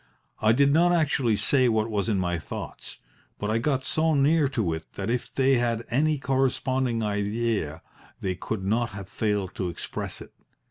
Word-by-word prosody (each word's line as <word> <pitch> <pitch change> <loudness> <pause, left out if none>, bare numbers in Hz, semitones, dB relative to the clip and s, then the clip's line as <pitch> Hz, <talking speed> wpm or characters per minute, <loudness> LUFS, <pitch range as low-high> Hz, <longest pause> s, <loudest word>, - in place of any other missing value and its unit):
I 110 - +5
did 140 +4 +4
not 175 +3 +4
actually 140 -8 +2
say 130 +3 +3
what 110 -1 +1
was 105 -1 -1
in 105 - +1
my 90 -2 -1
thoughts, 75 - -7 0.4
but 105 +1 -2
I 115 - +2
got 130 +1 0
so 160 +1 +2
near 145 +1 +3
to 110 -12 -1
it 80 0 -7
that 100 +3 -2
if 125 0 -2
they 135 -1 +3
had 120 -1 -1
any 150 +5 +2
corresponding 130 -2 0
idea 105 -5 -1 0.4
they 95 - -1
could 95 +2 -4
not 115 +4 +1
have 100 -2 -7
failed 105 -2 -1
to 90 - -1
express 85 - -5
it. - - -12
115 Hz, 180 wpm, -26 LUFS, 105-135 Hz, 0.4 s, I